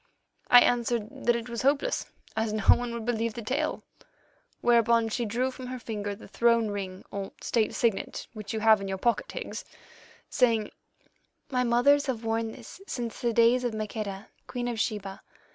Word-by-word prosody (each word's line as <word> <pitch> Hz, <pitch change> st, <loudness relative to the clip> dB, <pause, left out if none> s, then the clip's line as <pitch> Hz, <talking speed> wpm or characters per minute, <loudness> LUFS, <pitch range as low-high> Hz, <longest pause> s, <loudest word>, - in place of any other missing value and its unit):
"I 245 Hz, -, +9 dB
answered 240 Hz, +1 st, 0 dB
that 240 Hz, -, +5 dB
it 235 Hz, 0 st, -4 dB
was 235 Hz, -1 st, -4 dB
hopeless, 285 Hz, -, +1 dB, 0.3 s
as 220 Hz, 0 st, 0 dB
no 215 Hz, -2 st, -2 dB
one 245 Hz, -1 st, +5 dB
would 235 Hz, -1 st, -5 dB
believe 230 Hz, -2 st, -1 dB
the 235 Hz, -, -6 dB
tale, 260 Hz, +6 st, -1 dB, 0.8 s
whereon 235 Hz, -1 st, +4 dB
she 235 Hz, +2 st, -1 dB
drew 245 Hz, +5 st, 0 dB
from 255 Hz, 0 st, -8 dB
her 255 Hz, 0 st, -5 dB
finger 205 Hz, -4 st, -4 dB
the 215 Hz, -, -13 dB
throne 235 Hz, -2 st, +2 dB
ring 190 Hz, -2 st, -5 dB
or 195 Hz, -1 st, -5 dB
State 225 Hz, -3 st, 0 dB
signet 225 Hz, -5 st, -1 dB
which 215 Hz, -2 st, -7 dB
you 220 Hz, -, -2 dB
have 220 Hz, -2 st, +6 dB
in 195 Hz, -, -4 dB
your 190 Hz, 0 st, -2 dB
pocket, 240 Hz, -, 0 dB
Higgs, -, -, -5 dB, 0.6 s
saying: 225 Hz, -4 st, +2 dB, 0.8 s
'My 250 Hz, -1 st, +2 dB
mothers 265 Hz, +5 st, +4 dB
have 235 Hz, -4 st, -3 dB
worn 225 Hz, 0 st, 0 dB
this 245 Hz, +10 st, -12 dB
since 235 Hz, -2 st, -4 dB
the 240 Hz, -, +1 dB
days 235 Hz, +2 st, +4 dB
of 240 Hz, -3 st, -1 dB
Maqueda, 215 Hz, -2 st, -5 dB, 0.2 s
Queen 245 Hz, -1 st, -3 dB
of 235 Hz, -2 st, -3 dB
Sheba. 200 Hz, -3 st, -3 dB
230 Hz, 180 wpm, -28 LUFS, 215-245 Hz, 0.8 s, I